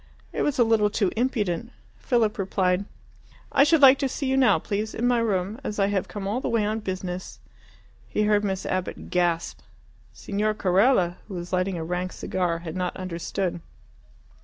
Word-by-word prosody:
It - - -2
was 295 - 0
a 245 - +6
little 225 -2 +3
too 200 -2 0
impudent. 220 -8 -1 0.3
Philip 225 - +1
replied, 190 0 +1 0.7
"I 275 - +5
should 300 0 +4
like 270 0 +8
to 270 - 0
see 275 - -4
you 265 0 +1
now, 265 -2 +5
please, 210 +1 -3
in 240 - 0
my 245 -1 +3
room, 205 0 -1
as 210 - -4
I 200 - +3
have 195 -2 -1
come 200 -2 -5
all 225 +6 -1
the - - -2
way 225 -3 +1
on 215 +1 -1
business." 185 -2 -5 0.7
He 210 - 0
heard 210 0 +3
Miss 190 -2 -2
Abbott 185 -1 -3
gasp. 175 -2 0 0.5
Signor 210 +1 -2
Carella, 185 -2 +3
who 200 - -7
was 175 +1 -6
lighting 185 0 0
a 165 - -3
rank 180 +2 -3
cigar, 175 -3 -1
had 160 - -5
not 180 -1 -2
understood. 185 0 -3
200 Hz, 185 wpm, -25 LUFS, 180-225 Hz, 0.7 s, like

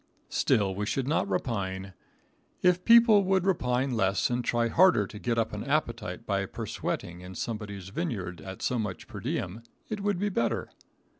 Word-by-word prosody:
Still 100 -3 +2
we 105 +2 -3
should 135 +3 -1
not 140 -9 +1
repine. 95 -2 -2 0.7
If 180 0 +4
people 230 -3 +7
would 190 -1 +2
repine 130 -8 +1
less 100 -2 +1
and 120 0 0
try 120 0 +1
harder 165 - +5
to 105 0 -9
get 115 +1 -1
up 115 - 0
an 105 - -4
appetite 115 -8 -2
by 100 -2 0
persweating 85 -1 -4
in 90 +1 -9
someone's 100 -4 -5
vineyard 100 - -4
at 95 0 -8
so 125 - 0
much 100 -5 -4
per - - -8
diem, 95 +6 -3 0.3
it 210 -2 -3
would 200 -2 0
be 205 +3 0
better. 120 - -1
115 Hz, 170 wpm, -28 LUFS, 100-155 Hz, 0.7 s, people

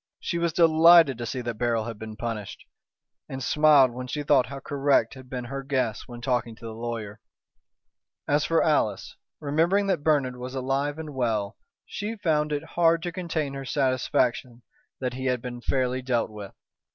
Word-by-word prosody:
She 170 - -3
was 170 0 +1
delighted 165 -4 +6
to 120 - -4
see 130 +2 -3
that 120 -3 -5
Beryl 115 -2 +1
had 115 -2 -7
been 110 -1 -7
punished, 105 -2 -6 0.6
and 130 -1 -5
smiled 150 -4 +5
when 125 +1 -6
she 150 +3 -3
thought 140 -5 +3
how 135 +2 -7
correct 140 0 +1
had 130 -1 -13
been 125 -1 -4
her 135 +3 -5
guess 130 -6 -2
when 120 -1 -9
talking 120 -2 -1
to 115 - -13
the 110 - -6
lawyer. 115 -2 -5 1.1
As 145 +1 +2
for 165 0 +2
Alice, 110 - 0 0.2
remembering 165 +8 +1
that 185 -7 0
Bernard 140 -5 +1
was 125 +1 -7
alive 135 +3 -1
and 155 -2 -7
well, 110 -5 -1 0.3
she 210 +2 -5
found 155 -7 0
it 145 0 -2
hard 165 0 +2
to 175 - -3
contain 165 -5 -3
her 135 0 -6
satisfaction 130 -2 0 0.4
that 125 -2 -2
he 130 +1 -5
had 125 -1 +1
been 120 0 -7
fairly 130 0 0
dealt 120 -3 -1
with. 105 -2 -9
130 Hz, 180 wpm, -26 LUFS, 120-150 Hz, 1.1 s, delighted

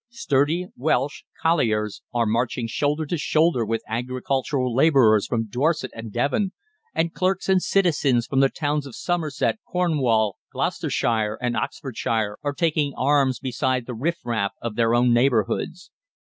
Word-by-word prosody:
Sturdy 170 - 0
Welsh 140 0 -1 0.2
colliers 110 -11 +1
are 120 -1 +1
marching 115 +2 0
shoulder 145 +6 -1
to 165 +2 -2
shoulder 155 -4 +2
with 115 +1 -2
agricultural 130 +2 -1
labourers 125 -7 +4
from 115 -2 -1
Dorset 135 +4 0
and 115 -1 -8
Devon, 145 - 0 0.4
and 165 0 0
clerks 185 0 0
and 190 -1 +4
citizens 145 -12 +2
from 135 - 0
the 135 0 +5
towns 145 -1 -2
of 130 - -10
Somerset, 170 +3 -1
Cornwall, 130 - +1
Gloucestershire, 110 -2 -1
and 125 -1 -1
Oxfordshire 110 -5 -2
are 145 -1 -2
taking 155 -3 0
arms 135 -2 +2
beside 130 -1 -1
the 125 - -6
riff 160 +9 -1
raff 110 -4 -1
of 115 -2 -4
their 115 0 +2
own 120 0 +4
neighbourhoods. 120 - 0
130 Hz, 145 wpm, -23 LUFS, 115-155 Hz, 0.4 s, the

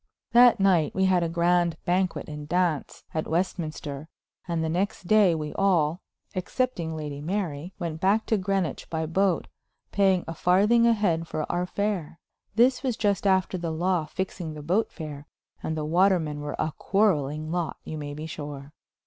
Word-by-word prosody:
That 240 -1 +7
night 185 -6 +3
we 190 - +3
had 185 -2 +3
a 170 - 0
grand 170 0 +2
banquet 180 +1 0
and 150 -1 -7
dance 175 -4 0
at 155 - -2
Westminster, 160 -4 -3 0.4
and 170 -2 -1
the - - 0
next 180 +3 -2
day 200 -3 +5
we 150 -1 -4
all, 175 -4 +2 0.3
excepting 185 -4 -2
Lady 150 -2 -5
Mary, 175 -1 -3
went 165 -3 -4
back 205 +4 +3
to 220 - +1
Greenwich 190 -3 -2
by 160 -1 -2
boat, 185 +2 +1 0.4
paying 190 -3 +3
a 165 - -4
farthing 210 +8 +4
a 235 - +5
head 170 -7 0
for 155 -1 -3
our 180 +1 -1
fare. 200 -6 -2 0.4
This 250 +3 +4
was 255 -4 -1
just 205 -2 +1
after 190 -1 +2
the 170 -1 -3
law 170 +1 0
fixing 175 -3 -4
the 150 - -8
boat 185 +9 +1
fare, 150 -3 -8 0.3
and 160 - -3
the 155 - -2
watermen 165 -3 +2
were 145 0 -4
a 155 - -1
quarreling 155 -7 +1
lot, 175 -1 -2
you 155 - -6
may 145 -1 -5
be 155 +1 -6
sure. 145 -2 -7
175 Hz, 175 wpm, -26 LUFS, 155-195 Hz, 0.4 s, That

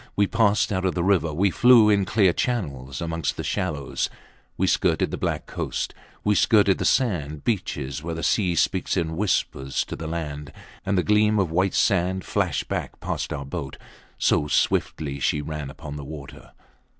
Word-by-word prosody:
We 100 - +3
passed 105 -1 +2
out 95 -1 -1
of 95 - 0
the 85 - 0
river; 90 -5 +2
we 95 +6 +1
flew 120 +1 +6
in 100 -2 +3
clear 95 -5 +3
channels 70 - -3
amongst 85 -1 -2
the - - -3
shallows. 70 -3 -2 0.5
We - - +2
skirted - - +1
the - - -2
black - - -2
coast; - - -3 0.3
we 105 - +3
skirted 100 -2 +4
the - - -1
sand 75 - 0
beaches 70 - -2
where 80 +1 -4
the 80 - -5
sea 90 -5 +2
speaks 95 +3 +1
in 80 -2 -1
whispers 80 -8 -1
to - - -6
the 80 - -6
land; 75 -3 -5 0.4
and 95 0 +1
the 90 - +2
gleam 105 0 +3
of 95 -5 +1
white 95 +3 +1
sand 95 -1 +1
flashed - - -1
back - - -4
past - - -3
our 70 -1 -4
boat, 70 -1 -6 0.4
so 75 - +2
swiftly 70 -1 0
she 75 - +1
ran 75 -1 -5
upon 75 +1 -8
the 70 - -7
water. 70 -1 -10
85 Hz, 180 wpm, -24 LUFS, 75-100 Hz, 0.5 s, flew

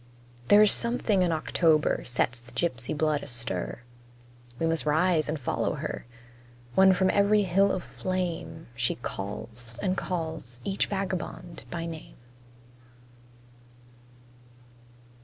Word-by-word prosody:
There 205 +1 +8
is 210 - +6
something 235 -4 +1
in 175 -2 +2
October 160 -1 +2
sets 125 0 0
the 120 - -16
gypsy 130 -5 -1
blood 155 -1 +1
astir; 120 -2 -3 0.7
We 165 - -1
must 165 -1 +2
rise 160 +1 +2
and 155 0 -2
follow 125 - -1
her, - - -5 0.7
When 190 +4 +7
from 190 0 +3
every 205 +1 +4
hill 195 +2 +3
of 180 - -2
flame 180 -3 -4
She 120 0 0
calls 115 +2 -6
and 185 +8 0
calls 160 -10 -4
each 195 +6 0
vagabond 185 -3 -4
by 170 -1 -4
name. 165 -2 -8
165 Hz, 120 wpm, -28 LUFS, 125-185 Hz, 0.7 s, There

